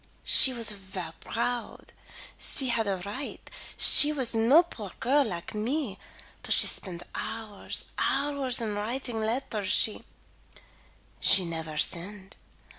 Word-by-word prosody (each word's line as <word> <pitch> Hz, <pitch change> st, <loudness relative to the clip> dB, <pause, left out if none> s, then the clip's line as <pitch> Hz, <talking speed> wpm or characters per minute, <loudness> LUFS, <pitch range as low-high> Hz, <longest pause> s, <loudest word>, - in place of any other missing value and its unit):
She 265 Hz, -, +5 dB
was 230 Hz, -3 st, +1 dB
ver 190 Hz, -4 st, -7 dB
proud. 240 Hz, +1 st, -5 dB, 0.4 s
She 265 Hz, -2 st, 0 dB
had 225 Hz, -2 st, 0 dB
a 195 Hz, -1 st, -1 dB
right; 255 Hz, +8 st, -7 dB, 0.3 s
she 295 Hz, -, +8 dB
was 265 Hz, -6 st, -2 dB
no 235 Hz, +9 st, +4 dB
poor 220 Hz, -, -10 dB
girl 275 Hz, +4 st, +2 dB
like 175 Hz, -6 st, -6 dB
me 220 Hz, 0 st, -3 dB, 0.4 s
but -, -, -1 dB
she -, -, +5 dB
spend 175 Hz, -3 st, -1 dB
hours 220 Hz, -3 st, -6 dB
hours 275 Hz, -2 st, -1 dB
in 220 Hz, -3 st, -3 dB
writing 230 Hz, +3 st, -4 dB
letters 220 Hz, -3 st, -3 dB
she 215 Hz, -, +2 dB, 1.4 s
nevaire 160 Hz, -2 st, -6 dB
send. 190 Hz, +5 st, -3 dB
225 Hz, 120 wpm, -27 LUFS, 195-260 Hz, 1.4 s, she